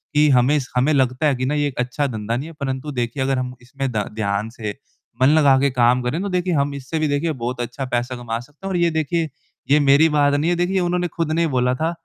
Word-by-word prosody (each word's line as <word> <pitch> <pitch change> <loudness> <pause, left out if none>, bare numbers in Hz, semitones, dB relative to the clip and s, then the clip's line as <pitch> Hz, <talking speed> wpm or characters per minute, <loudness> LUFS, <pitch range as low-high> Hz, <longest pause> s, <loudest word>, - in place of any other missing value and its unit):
कि 150 0 +5
हमें 130 +2 +4
इस 135 -3 -1
हमें 130 +5 +3
लगता 130 +1 +1
है 140 - +2
कि 130 +1 -2
ना 145 - 0
ये 145 -1 +1
एक 135 - -6
अच्छा 125 +3 -1
धंधा 110 -1 -3
नहीं 140 - -5
है 165 - -11
परंतु 135 +1 -3
देखिए 125 0 -2
अगर 135 0 0
हम 125 0 -4
इसमें 135 +2 -4
ध 105 -3 -1
ध्यान 100 0 -1
से 110 -3 -5 0.5
मन 130 - +6
लगा 140 -3 +5
के 140 - +3
काम 125 0 +3
करें, 145 +8 -1
तो 200 - -2
देखिए 180 -1 0
हम 140 -1 +1
इससे 140 +4 -4
भी 155 - +1
देखिए 145 +3 0
बहुत 125 -2 -4
अच्छा 125 +3 -4
पैसा 125 +1 -1
कमा 115 -2 -4
सकते 145 +9 -14
हैं - - -2
और 180 - 0
ये 170 -1 +3
देखिए 160 +1 -1 0.4
ये 150 - +6
मेरी 145 +3 +5
बात 145 -1 +3
नहीं 145 +4 +1
है - - +2
देखिए 175 +2 0
ये 190 - +3
उन्होंने 175 0 0
खुद 165 -1 -3
ने 165 - +1
ही 165 - +2
बोला 125 -3 +1
था, 160 +5 -1
140 Hz, 275 wpm, -21 LUFS, 125-155 Hz, 0.5 s, मन